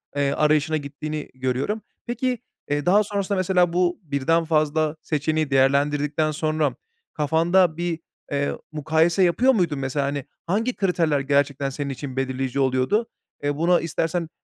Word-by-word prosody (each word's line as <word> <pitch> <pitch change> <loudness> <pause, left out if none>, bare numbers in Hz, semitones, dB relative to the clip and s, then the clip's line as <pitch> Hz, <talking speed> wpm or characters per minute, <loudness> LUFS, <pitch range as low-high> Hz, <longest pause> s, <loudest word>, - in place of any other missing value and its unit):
eee, 140 -1 +1
arayışına 155 +1 +2
gittiğini 150 +1 -5
görüyorum. 130 - -2 0.2
Peki, 245 +1 -1 0.3
eee, 145 0 -1
daha 205 +4 +5
sonrasında 200 -1 -2
mesela 180 -2 +2
bu 180 0 +1
birden 160 +3 +1
fazla 155 0 +1
seçeneği 155 0 -1
değerlendirdikten 145 +3 +2
sonra 155 0 0 0.4
kafanda 165 +3 +2
bir, 170 -1 -2 0.3
eee, 140 0 0 0.2
mukayese 160 +4 +2
yapıyor 250 +10 +4
muydun 170 - 0
mesela? 135 +1 -1
Hani, 140 -1 -3 0.2
hangi 225 +8 0
kriterler 170 -7 +1
gerçekten 140 0 +1
senin 140 +1 -4
için 135 0 -6
belirleyici 130 0 -2
oluyordu? 130 - +1 0.4
Eee, 145 0 -1
buna 175 +2 +3
istersen 165 +1 -2
155 Hz, 135 wpm, -23 LUFS, 140-175 Hz, 0.4 s, daha